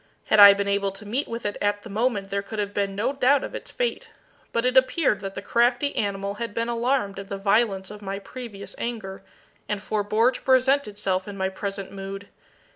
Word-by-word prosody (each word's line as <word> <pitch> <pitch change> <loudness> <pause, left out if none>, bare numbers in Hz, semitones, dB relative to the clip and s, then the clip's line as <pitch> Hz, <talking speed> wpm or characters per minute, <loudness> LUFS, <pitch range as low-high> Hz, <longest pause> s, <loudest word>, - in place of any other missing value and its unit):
Had 215 - +6
I 200 -1 +11
been 200 0 -1
able 200 0 +1
to 200 +2 -10
meet 245 +8 -1
with 230 -1 -6
it 205 - -2
at 205 0 0
the - - -9
moment 210 -2 -1
there 200 0 0
could 215 +2 -8
have 205 -1 -2
been 200 -1 -1
no 235 +7 0
doubt 275 +1 +3
of - - -6
its - - -7
fate, - - -2 0.4
but 230 +1 0
it 250 0 +2
appeared 260 - +3
that 195 -1 -6
the 195 - -6
crafty 245 +5 +2
animal 200 -1 -1
had 230 -3 -4
been 230 +1 -1
alarmed 235 -4 0
at 195 - -9
the 200 - -3
violence 195 -1 +1
of 210 0 -10
my 195 -1 -4
previous 205 -1 -8
anger, 215 -6 -5 0.5
and 210 -1 -2
forbore 215 +3 +2
to - - -8
present 265 +1 +3
itself 195 -2 -2
in 200 -1 -7
my 190 0 0
present 195 0 -5
mood. 195 0 -7
205 Hz, 215 wpm, -25 LUFS, 195-235 Hz, 0.5 s, I